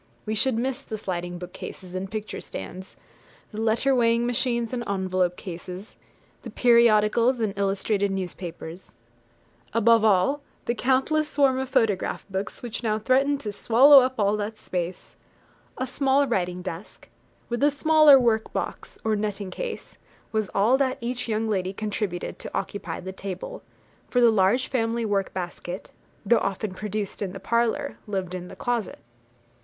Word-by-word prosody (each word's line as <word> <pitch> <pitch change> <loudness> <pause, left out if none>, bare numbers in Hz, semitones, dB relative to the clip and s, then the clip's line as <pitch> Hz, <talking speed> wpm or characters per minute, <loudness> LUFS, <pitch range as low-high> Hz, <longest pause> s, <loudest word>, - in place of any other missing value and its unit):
We 215 - -2
should 235 +2 +2
miss 260 +3 -2
the 220 - -6
sliding 175 -3 -4
bookcases 180 0 -9
and 185 +1 -4
picture 215 0 -5
stands, 185 - -8 0.6
the 215 0 -5
letter 230 +5 +2
weighing 235 -1 +3
machines 240 -1 0
and 240 -1 -2
envelope 185 -2 0
cases, 180 +3 -8 0.5
the - - -8
periodicals 235 +1 +4
and 215 -3 -1
illustrated 200 +1 0
newspapers 180 -2 -6 0.8
above 230 0 +5
all, 220 +8 +3 0.2
the 235 - +1
countless 270 +5 +1
swarm 270 -3 +3
of 265 -1 -3
photograph 205 -4 0
books 190 +5 -4
which 235 -3 -4
now 215 -3 0
threaten 265 +6 +2
to 220 -7 -5
swallow 265 +7 +7
up 260 0 +1
all 210 0 +1
space. 180 -3 -5 0.6
A 260 - -1
small 270 +2 +2
writing 180 -7 -1
desk, 180 +1 -8 0.4
with 240 +1 -3
a 290 - +5
smaller 305 -1 +6
work 225 -3 +1
box, - - -5
or 220 -1 +1
netting 205 -2 -3
case, - - -6 0.3
was 215 -2 -1
all 225 +7 +4
that 265 -1 0
each 245 +1 -3
young 220 0 0
lady 190 -3 -1
contributed 205 -4 -3
to - - -5
occupy 175 -5 -4
the 185 - -6
table; 190 -1 -6 0.5
for 250 - +2
the 235 -1 +6
large 220 +5 +3
family 230 -2 0
work 200 -2 0
basket, 180 0 -6 0.3
though 235 +4 +4
often 195 0 -2
produced 210 +1 -4
in 190 -3 -3
the 195 - -7
parlour, 235 +6 0
lived 190 -3 -3
in 180 -1 -5
the - - -10
closet. 240 -4 -2
215 Hz, 155 wpm, -25 LUFS, 190-245 Hz, 0.8 s, swallow